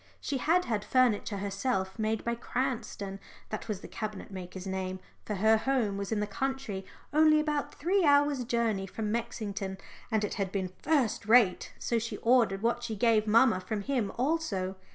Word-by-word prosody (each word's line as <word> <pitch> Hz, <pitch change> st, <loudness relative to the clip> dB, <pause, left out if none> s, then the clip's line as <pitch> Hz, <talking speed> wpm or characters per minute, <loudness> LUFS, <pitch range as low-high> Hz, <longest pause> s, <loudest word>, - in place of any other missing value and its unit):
She 275 Hz, -, -2 dB
had 350 Hz, +7 st, +3 dB
had 215 Hz, -3 st, -1 dB
furniture 235 Hz, -5 st, +2 dB
herself 195 Hz, 0 st, -2 dB
made 220 Hz, 0 st, 0 dB
by 235 Hz, -, +1 dB
Cranston 235 Hz, -5 st, -3 dB, 0.3 s
that 215 Hz, -, -5 dB
was 205 Hz, -4 st, -3 dB
the -, -, -8 dB
cabinet 215 Hz, -2 st, -6 dB
maker's 185 Hz, 0 st, -7 dB
name 190 Hz, -1 st, -3 dB, 0.3 s
for 210 Hz, -, -2 dB
her 220 Hz, +3 st, +4 dB
home 235 Hz, -4 st, 0 dB
was 200 Hz, +1 st, -4 dB
in 220 Hz, -, +1 dB
the 210 Hz, -, 0 dB
country 220 Hz, -3 st, -3 dB, 0.3 s
only 310 Hz, 0 st, +6 dB
about 300 Hz, -2 st, -1 dB
three 370 Hz, +5 st, +1 dB
hours' 285 Hz, -3 st, +4 dB
journey 225 Hz, -5 st, 0 dB
from 210 Hz, +2 st, -3 dB
Mexington 205 Hz, -4 st, -3 dB, 0.3 s
and 220 Hz, -2 st, +1 dB
it 210 Hz, -, -2 dB
had 195 Hz, -3 st, -2 dB
been 185 Hz, -2 st, -3 dB
first 265 Hz, -10 st, +1 dB
rate, 220 Hz, -5 st, +4 dB
so 235 Hz, -, 0 dB
she 230 Hz, +1 st, -4 dB
ordered 230 Hz, -5 st, +3 dB
what 235 Hz, +1 st, +1 dB
she 235 Hz, -2 st, -4 dB
gave 220 Hz, 0 st, +3 dB
mamma 225 Hz, -2 st, +5 dB
from 205 Hz, +3 st, -3 dB
him 240 Hz, -4 st, -1 dB
also. 240 Hz, -, 0 dB
220 Hz, 175 wpm, -30 LUFS, 200-255 Hz, 0.3 s, only